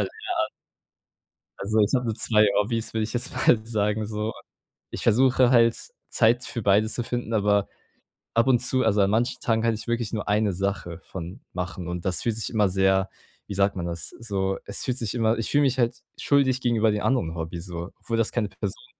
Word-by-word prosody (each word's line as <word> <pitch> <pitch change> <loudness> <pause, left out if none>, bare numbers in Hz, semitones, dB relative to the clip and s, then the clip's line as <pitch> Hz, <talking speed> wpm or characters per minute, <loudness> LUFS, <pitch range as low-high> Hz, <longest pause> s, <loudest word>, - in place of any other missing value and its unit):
an. - - 0 1.5
Also, 110 +2 0
ich 105 +3 +3
habe 125 -1 0
nur 110 -2 -1
2 110 -2 +3
Hobbys, 115 +2 -2
würde 110 -1 0
ich 110 - -4
jetzt 125 +1 -1 0.2
mal 115 - +6
sagen, 105 -1 0
so. 105 +1 -3 0.6
Ich - - -5
versuche 130 +1 +4
halt 115 -2 +5 0.3
Zeit 120 +3 +3
für 115 - -5
beides 105 +3 +3
zu 120 - -2
finden, 120 -2 -3
aber 105 -1 +2 0.7
ab 115 +2 +3
und 125 -2 +5
zu, 130 +1 +1
also, 105 -2 +3
an 100 0 +3
manchen 115 +3 0
Tagen 115 -1 +1
kann 115 -1 +2
ich 105 - -7
wirklich 120 -2 -1
nur 105 -2 -3
1 105 -1 +2
Sache 90 -2 -3
von 90 +1 -8
machen 90 -1 -5
und 90 -1 -4
das 95 -2 0
fühlt 115 -2 0
sich 115 - -3
immer 105 -3 +2
sehr, 95 +1 +2 0.4
wie 100 - -6
sagt 100 0 +1
man 85 - -3
das? 85 -2 -4
So, 95 -4 -2
es - - -4
fühlt 125 0 -1
sich 115 -4 -3
immer 115 -1 +1
ich 115 - -2
fühle 145 0 +3
mich 135 -2 +1
halt 120 -1 0 0.2
schuldig 130 -3 +2
gegenüber 115 -3 +2
den 105 - -1
anderen 120 -11 0
Hobbys, 85 +1 -5
so, 85 0 -6
obwohl 115 - -3
das 115 - +2
keine 110 -4 0
Person 475 - -6
110 Hz, 210 wpm, -25 LUFS, 100-120 Hz, 1.5 s, mal